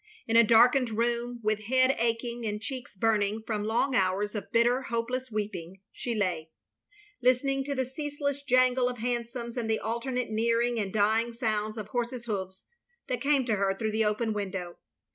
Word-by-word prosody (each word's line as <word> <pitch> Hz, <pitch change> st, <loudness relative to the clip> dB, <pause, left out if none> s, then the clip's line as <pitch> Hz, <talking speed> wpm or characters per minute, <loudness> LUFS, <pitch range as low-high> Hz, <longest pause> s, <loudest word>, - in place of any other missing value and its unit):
In 225 Hz, -, -1 dB
a 230 Hz, -, +8 dB
darkened 240 Hz, +3 st, +5 dB
room, 240 Hz, +1 st, -1 dB
with 215 Hz, 0 st, 0 dB
head 255 Hz, +3 st, +3 dB
aching 235 Hz, +1 st, -1 dB
and 210 Hz, -1 st, -2 dB
cheeks 250 Hz, 0 st, -7 dB
burning 215 Hz, +1 st, +1 dB
from 210 Hz, -2 st, -2 dB
long 235 Hz, +5 st, +1 dB
hours 195 Hz, +1 st, +1 dB
of 205 Hz, -3 st, -6 dB
bitter, 240 Hz, +3 st, +3 dB
hopeless 250 Hz, +1 st, -3 dB
weeping 200 Hz, -4 st, -4 dB
— -, -, -60 dB
she 240 Hz, -2 st, -1 dB
lay; 175 Hz, -6 st, -1 dB, 0.7 s
listening 270 Hz, +2 st, +2 dB
to 280 Hz, 0 st, -2 dB
the 260 Hz, -1 st, 0 dB
ceaseless 285 Hz, +1 st, -3 dB
jangle 255 Hz, -2 st, +3 dB
of 250 Hz, -, -5 dB
hansoms, 235 Hz, +1 st, -3 dB
and 230 Hz, -2 st, -2 dB
the 220 Hz, -, +2 dB
alternate 235 Hz, +1 st, -2 dB
nearing 230 Hz, +2 st, +1 dB
and 200 Hz, -3 st, -2 dB
djong 220 Hz, +3 st, +2 dB
sounds 215 Hz, -2 st, -1 dB
of 210 Hz, -1 st, -6 dB
horses' 240 Hz, 0 st, -3 dB
hoofs, 190 Hz, -4 st, -4 dB, 0.4 s
that 250 Hz, -2 st, -2 dB
came 275 Hz, -2 st, +2 dB
to 220 Hz, -4 st, +1 dB
her 195 Hz, 0 st, +1 dB
through 220 Hz, +2 st, -2 dB
the 220 Hz, +1 st, +1 dB
open 215 Hz, +1 st, 0 dB
window. 190 Hz, -4 st, -4 dB
230 Hz, 180 wpm, -28 LUFS, 210-250 Hz, 0.7 s, a